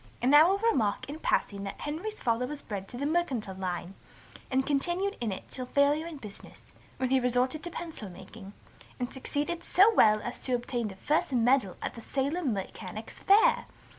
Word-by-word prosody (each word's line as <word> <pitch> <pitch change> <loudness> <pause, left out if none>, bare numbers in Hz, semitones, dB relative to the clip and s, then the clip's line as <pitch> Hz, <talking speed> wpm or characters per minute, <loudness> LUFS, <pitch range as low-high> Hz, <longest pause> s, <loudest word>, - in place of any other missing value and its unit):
And 250 +3 +2
now 300 +3 +8
I - - +3
will 390 - +3
remark 270 - +1
in 295 +3 -6
passing 200 -9 0
that 195 - -6
Henry's 355 +9 -4
father 235 +1 +1
was 295 0 -7
bred 195 -3 -5
to 240 - -9
the 280 - -2
mercantile 285 - 0
line, 185 -1 -4 0.6
and 265 0 +1
continued 350 +8 0
in 225 -3 -1
it 190 - -6
till 255 -1 -5
failure 290 +4 +2
in 330 -3 -7
business; 210 -6 -12 0.2
when 260 -1 -1
he 265 - +5
resorted 250 +4 +1
to 345 - -5
pencil 325 - -7
making, 200 +2 -11 0.5
and 245 0 -3
succeeded 295 +5 -3
so 405 +5 +5
well 215 - +5
as 240 - -6
to 255 - -2
obtain 240 -1 -2
the 195 - -8
first 295 +10 0
medal 245 -5 +3
at - - -3
the 230 - -9
Salem 280 +4 -1
Mechanics' 200 +1 -6
Fair. 405 +3 +5
260 Hz, 195 wpm, -29 LUFS, 220-310 Hz, 0.6 s, now